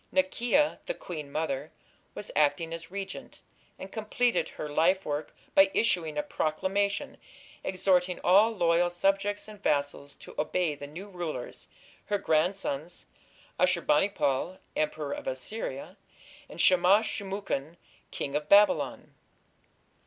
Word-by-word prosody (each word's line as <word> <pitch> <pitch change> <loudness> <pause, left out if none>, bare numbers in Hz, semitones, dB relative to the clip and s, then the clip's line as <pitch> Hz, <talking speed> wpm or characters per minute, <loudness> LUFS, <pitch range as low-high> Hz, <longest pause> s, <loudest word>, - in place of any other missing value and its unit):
Naki'a, 280 0 +2
the - - -2
queen 155 - -7
mother, 150 -1 -2 0.4
was 205 - -6
acting 155 +2 +2
as 165 0 -7
regent, 195 +1 -7 0.4
and 190 - -9
completed 230 +2 0
her 150 - -6
lifework 155 0 +1 0.2
by 195 0 +6
issuing 165 -9 +1
a 150 - +1
proclamation 195 +6 -1 0.5
exhorting 185 -1 +1
all 200 +5 +6
loyal 175 -4 +2
subjects 195 +4 0
and 210 -2 -12
vassals 145 -3 -1
to - - -12
obey 160 +1 0
the 145 0 -8
new 175 +8 -9
rulers, 170 -10 -6 0.4
her 205 - 0
grandsons, 170 -2 -1 0.5
Ashur 180 -2 +3
bani 150 +7 +3
pal, 175 0 -1 0.2
Emperor 150 -1 -1
of - - -7
Assyria, 135 +1 -5 0.5
and - - -11
Shamash 185 +4 +5
shum 200 -2 -4
ukin, 170 -6 -3 0.3
King 140 - -4
of 150 0 -2
Babylon. 205 +1 +4
175 Hz, 125 wpm, -29 LUFS, 150-200 Hz, 0.5 s, by